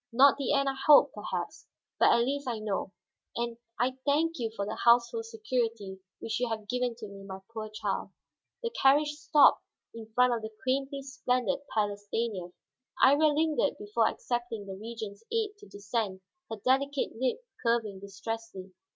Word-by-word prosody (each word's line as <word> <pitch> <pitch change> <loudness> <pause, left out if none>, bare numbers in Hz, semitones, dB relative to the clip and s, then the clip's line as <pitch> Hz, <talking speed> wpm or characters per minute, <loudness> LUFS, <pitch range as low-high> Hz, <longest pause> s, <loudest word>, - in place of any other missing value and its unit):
Not 265 +4 +6
the 275 - 0
end 275 -1 +2
I 270 - +1
hoped, 295 -1 +8
perhaps, - - -5 0.3
but - - +6
at 235 - +4
least 280 +2 -2
I 235 -2 -1
know. 210 -3 -3 0.4
And 235 0 -2 0.2
I 255 +2 0
thank 315 +2 +1
you 230 -2 -1
for 200 - -2
the 210 - -4
household 240 - +4
security 230 - -3 0.2
which 225 - -3
you 245 -1 0
have 215 -2 -4
given 250 +1 -1
to 220 -2 -8
me, 200 0 -11
my 190 -1 -7 0.2
poor 215 -1 -5
child." 215 - -3 0.5
The 465 - -1
carriage 295 - +4
stopped 295 -1 +4 0.3
in 225 -1 -10
front 250 0 +5
of 235 - -2
the 220 - -5
quaintly 275 +1 -1
splendid 250 -4 0 0.2
Palace 205 -1 -1
Stanief. 205 -6 -2 0.5
Iría 295 +3 +6
lingered 315 0 +1
before 415 0 +1
accepting 240 - -3
the 195 - -6
Regent's 215 0 -7
aid 445 -2 0
to 410 - -14
descend, 205 -1 -3 0.3
her 225 - -3
delicate 275 +2 +2
lip 260 - 0 0.2
curving 230 -5 0
distressedly. 200 0 -6
240 Hz, 170 wpm, -29 LUFS, 215-275 Hz, 0.5 s, hoped